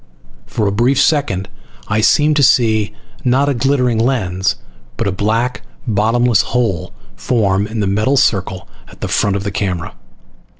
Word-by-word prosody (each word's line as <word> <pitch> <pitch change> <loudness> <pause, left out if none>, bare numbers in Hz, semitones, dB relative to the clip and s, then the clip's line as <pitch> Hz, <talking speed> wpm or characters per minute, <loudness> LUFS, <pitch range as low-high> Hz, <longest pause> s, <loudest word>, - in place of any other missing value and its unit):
For 110 - -2
a 100 - +1
brief 120 +6 +2
second 120 - +1 0.4
I 110 +1 0
seemed 150 +7 +3
to - - +3
see 110 -5 +3 0.3
not 130 +3 +2
a - - +1
glittering 125 -2 +1
lens 100 -6 0 0.4
but - - -2
a - - 0
black 110 +6 -1 0.2
bottomless 115 +2 +2
hole 115 -9 -2 0.2
form 100 -4 0
in 110 0 -4
the - - 0
metal 105 +8 +1
circle 95 -5 0 0.2
at - - -17
the - - -2
front 100 -2 +1
of 100 - -2
the 100 - -3
camera. 90 -3 -3
110 Hz, 160 wpm, -16 LUFS, 100-125 Hz, 0.4 s, seemed